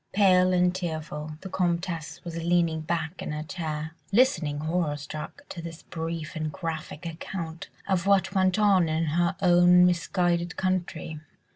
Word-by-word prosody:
Pale 185 Hz, -2 st, +5 dB
and 180 Hz, 0 st, +3 dB
tearful, 155 Hz, -4 st, -4 dB
the 190 Hz, -, -7 dB
Comtesse 170 Hz, -3 st, -2 dB
was 170 Hz, -1 st, -6 dB
leaning 170 Hz, -1 st, +1 dB
back 160 Hz, +1 st, -3 dB
in -, -, -4 dB
her 150 Hz, 0 st, -3 dB
chair, 155 Hz, -2 st, -4 dB, 0.2 s
listening 195 Hz, -, +2 dB
horror 155 Hz, -2 st, 0 dB
struck 150 Hz, -, -7 dB
to 170 Hz, -, -6 dB
this 165 Hz, -1 st, -8 dB
brief 165 Hz, -1 st, -5 dB
and 155 Hz, -1 st, -2 dB
graphic 160 Hz, 0 st, -5 dB
account 165 Hz, 0 st, -6 dB, 0.2 s
of 190 Hz, -1 st, +1 dB
what 190 Hz, -2 st, +3 dB
went 185 Hz, 0 st, +3 dB
on 195 Hz, -5 st, +4 dB
in 160 Hz, +1 st, +1 dB
her 170 Hz, +4 st, +1 dB
own 180 Hz, 0 st, +6 dB
misguided 175 Hz, 0 st, +1 dB
country. 175 Hz, -4 st, -2 dB
170 Hz, 150 wpm, -27 LUFS, 160-180 Hz, 0.2 s, own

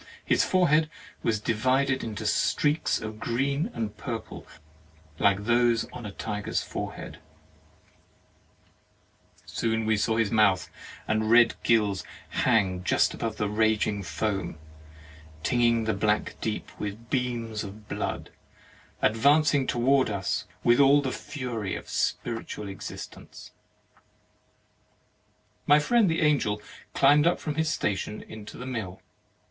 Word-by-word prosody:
His -, -, +3 dB
forehead 160 Hz, -4 st, +3 dB, 0.3 s
was 110 Hz, -2 st, 0 dB
divided 130 Hz, +5 st, +1 dB
into 110 Hz, -3 st, -5 dB
streaks 150 Hz, +2 st, +1 dB
of 110 Hz, 0 st, -7 dB
green 140 Hz, -, -1 dB
and 110 Hz, -, -4 dB
purple, 115 Hz, -4 st, -6 dB, 0.7 s
like 100 Hz, 0 st, +3 dB
those 120 Hz, 0 st, +3 dB
on 120 Hz, -3 st, -7 dB
a -, -, -7 dB
tiger's 105 Hz, 0 st, -3 dB
forehead; -, -, -6 dB, 2.3 s
soon 110 Hz, -1 st, -1 dB
we 110 Hz, 0 st, +3 dB
saw 110 Hz, +2 st, +1 dB
his 115 Hz, -3 st, +1 dB
mouth 100 Hz, -4 st, +3 dB, 0.4 s
and 110 Hz, 0 st, 0 dB
red 120 Hz, 0 st, +6 dB
gills 105 Hz, -4 st, +2 dB, 0.3 s
hang 95 Hz, -7 st, +1 dB
just -, -, +2 dB
above 115 Hz, -2 st, -4 dB
the 105 Hz, -, 0 dB
raging 105 Hz, -1 st, +1 dB
foam, 95 Hz, -3 st, -3 dB, 0.9 s
tinging 120 Hz, +1 st, +2 dB
the 110 Hz, 0 st, 0 dB
black 105 Hz, +1 st, 0 dB
deeps 110 Hz, -1 st, -4 dB
with 105 Hz, +3 st, -6 dB
beams 120 Hz, -4 st, -2 dB
of 105 Hz, +1 st, -10 dB
blood, -, -, -4 dB, 0.7 s
ad 110 Hz, -, +3 dB
vancing 145 Hz, +2 st, +4 dB
toward 130 Hz, +2 st, +2 dB
us 100 Hz, -3 st, -2 dB, 0.2 s
with 120 Hz, +2 st, +4 dB
all 140 Hz, +1 st, +6 dB
the 130 Hz, -, -1 dB
fury 120 Hz, -10 st, -4 dB
of -, -, -7 dB
a -, -, -15 dB
spiritual 115 Hz, -3 st, -2 dB
existence. 95 Hz, 0 st, -9 dB, 2.2 s
My 145 Hz, -, +7 dB
friend 210 Hz, +6 st, +3 dB
the 160 Hz, -, 0 dB
Angel 135 Hz, -9 st, +2 dB, 0.4 s
climbed 145 Hz, +3 st, +5 dB
up 175 Hz, -, +2 dB
from 150 Hz, -, -3 dB
his 160 Hz, +1 st, 0 dB
station 105 Hz, +1 st, -2 dB
into 110 Hz, -1 st, -10 dB
the 125 Hz, -, -7 dB
mill. 110 Hz, -8 st, -5 dB
115 Hz, 125 wpm, -27 LUFS, 105-135 Hz, 2.3 s, My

